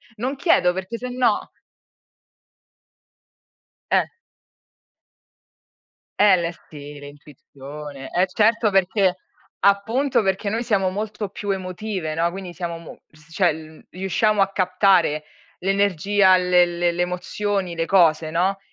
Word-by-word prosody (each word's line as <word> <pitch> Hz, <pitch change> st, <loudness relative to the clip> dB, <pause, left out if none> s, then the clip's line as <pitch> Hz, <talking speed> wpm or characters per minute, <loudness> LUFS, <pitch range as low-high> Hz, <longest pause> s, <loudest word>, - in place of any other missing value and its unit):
Non 255 Hz, +5 st, -3 dB
chiedo, 180 Hz, -, +3 dB
perché 190 Hz, +5 st, -5 dB
sennò 250 Hz, +1 st, 0 dB, 2.5 s
Eh -, -, +3 dB, 2.1 s
è 205 Hz, -2 st, +6 dB
l'isti 150 Hz, -4 st, -7 dB
l'intuizione. 145 Hz, -1 st, -11 dB
Eh 180 Hz, +2 st, +2 dB
certo, 220 Hz, +3 st, +2 dB
perché 190 Hz, -1 st, +2 dB, 0.5 s
appunto, 225 Hz, +9 st, +2 dB
perché 195 Hz, +1 st, -1 dB
noi 225 Hz, +3 st, -2 dB
siamo 200 Hz, -5 st, +1 dB
molto 210 Hz, +1 st, -4 dB
più 205 Hz, +1 st, -7 dB
emotive, 185 Hz, -3 st, -3 dB
no, 165 Hz, +2 st, +1 dB
quindi, 185 Hz, 0 st, -8 dB
siamo, 170 Hz, -2 st, -5 dB
mo 165 Hz, -1 st, -13 dB, 0.3 s
cioè, 180 Hz, +1 st, +2 dB
l 155 Hz, 0 st, -11 dB
riusciamo 195 Hz, +3 st, 0 dB
a 195 Hz, 0 st, +2 dB
captare 185 Hz, -5 st, +2 dB, 0.4 s
l'energia, 195 Hz, 0 st, +3 dB
le 180 Hz, -1 st, +4 dB
le 175 Hz, 0 st, -1 dB
le 170 Hz, +1 st, -3 dB
emozioni, 180 Hz, +1 st, -2 dB
le 165 Hz, 0 st, -1 dB
cose, 165 Hz, -4 st, +3 dB
no, 185 Hz, +4 st, 0 dB
185 Hz, 110 wpm, -22 LUFS, 170-205 Hz, 2.5 s, è